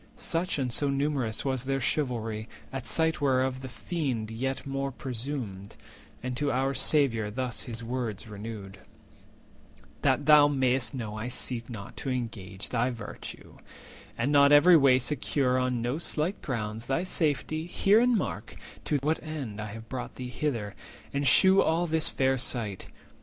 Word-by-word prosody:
Such 170 +1 -1
and 130 -4 -1
so 145 +3 +2
numerous 140 -5 -1
was 130 -2 -1
their 135 0 0
chivalry; 115 -5 -1 0.2
At 135 -1 -4
sight 160 -1 +2
whereof 130 -1 +1
the 130 - -6
Fiend 130 -7 -3
yet 135 +4 -3
more 135 0 -2
presumed, 120 -6 -5 0.5
And 125 0 -3
to 145 +1 +1
our 135 +2 +1
Saviour 130 -8 +2
thus 125 +2 -4
his 115 -1 -6
words 115 -3 -4
renewed:— 105 -2 -8 1.2
"That - - +2
thou 150 -1 +8
may'st 130 -2 +1
know 110 -4 -4
I 110 - -3
seek 125 -1 -2
not 100 -4 -8
to 135 - -4
engage 110 -6 -4
Thy 120 +2 +1
virtue, 115 -4 -8 0.6
and 120 +5 0
not 140 -1 +6
every 165 +5 +8
way 135 -4 +6
secure 130 -1 +1
On 125 -2 0
no 125 +6 -1
slight 170 +3 -1
grounds 110 -3 -4
thy 140 +6 0
safety, 155 -2 -1
hear 200 +4 +4
and 245 -1 +4
mark - - -4 0.3
To 150 - +1
what 155 +2 +1
end 140 -10 -5
I 105 -1 -5
have 115 0 -9
brought 125 +1 -6
thee 125 -1 -6
hither, 120 -7 -2 0.4
and 140 0 +1
shew 190 +9 +7
350 - - +4
All 165 +2 +1
this 160 -1 +1
fair 130 0 +1
sight. 115 -6 -1
130 Hz, 165 wpm, -28 LUFS, 115-145 Hz, 1.2 s, thou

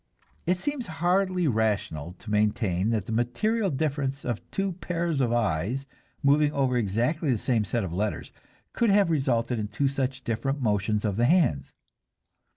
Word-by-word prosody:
It 180 +1 +3
seems 285 +4 -3
hardly 180 +1 +1
rational 105 - -1
to 105 +4 -10
maintain 105 -2 +1
that 110 -4 0
the - - -6
material 190 - 0
difference 140 -2 -2
of 120 -3 -2
two 195 0 -1
pairs 170 -4 -2
of 120 -3 +1
eyes, 115 +3 0 0.4
moving 145 +1 +4
over 135 -2 +1
exactly 120 - 0
the 120 - +2
same 115 0 +1
set 110 +3 -1
of 90 -3 -4
letters, 105 +4 -2 0.4
could 235 - +2
have 200 -3 +4
resulted 125 -5 +1
in 105 - -2
two 135 +7 0
such 135 -1 -2
different 125 +5 -1
motions 105 -2 0
of 100 -2 -1
the 120 - +3
hands. 125 - +2
125 Hz, 160 wpm, -27 LUFS, 105-155 Hz, 0.4 s, moving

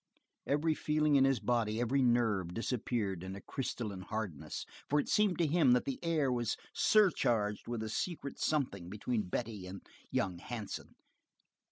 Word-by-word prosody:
Every 150 +3 +2
feeling 150 -1 +2
in 135 -1 +6
his 135 -2 +3
body, 115 -3 0
every 125 +3 +2
nerve, 110 -8 +2
disappeared 115 -5 -1
in 95 +1 -5
a - - -7
crystalline 115 -7 -4
hardness, 95 -8 -4 0.2
for 150 - +3
it - - -1
seemed 210 -3 +3
to 170 - +3
him 150 -4 +4
that 125 - +2
the 135 - -3
air 155 -5 +2
was 120 -3 0 0.2
surcharged 120 - +3
by 115 -2 -3
a - - -3
secret 140 - -3
something 110 - 0
between 105 0 -2
Betty 105 -3 -3
and 95 +1 -7 0.3
young 90 -3 -1
Hansen. 110 +1 -6
120 Hz, 160 wpm, -34 LUFS, 105-140 Hz, 0.3 s, in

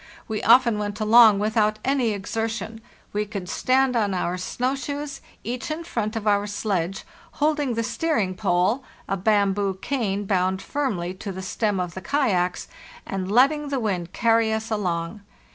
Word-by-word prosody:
We 220 -1 -3
often 235 -1 +5
went 205 0 -4
along 220 -1 +7
without 215 +1 +1
any 265 -3 +2
exertion; 225 +1 -3 0.3
we 210 +1 0
could 200 -3 -6
stand 260 +4 +2
on 205 -4 +1
our 180 0 -1
snow 245 +8 -2
shoes, 285 +1 -5 0.2
each 245 +4 -4
in 310 +2 -3
front 230 -9 -3
of 220 -1 -3
our 205 -1 +2
sledge, 195 -3 -2 0.3
holding 295 -4 0
the 230 - 0
steer 270 +8 -1
ing 190 -3 0
pole 190 +6 +1 0.2
(a 195 - 0
bamboo 200 0 +1
cane 205 -6 -2
bound 190 -1 +1
firmly 195 -10 -2
to 195 +2 -6
the 190 0 -6
stem 205 +1 -1
of 180 -2 -3
the 190 - -7
kayaks) 190 -9 0 0.4
and 190 0 -4
letting 285 +5 +3
the 275 -2 -1
wind 185 -6 -2
carry 230 -1 +2
us 220 +1 -3
along. 180 -1 -2
215 Hz, 165 wpm, -24 LUFS, 195-240 Hz, 0.4 s, along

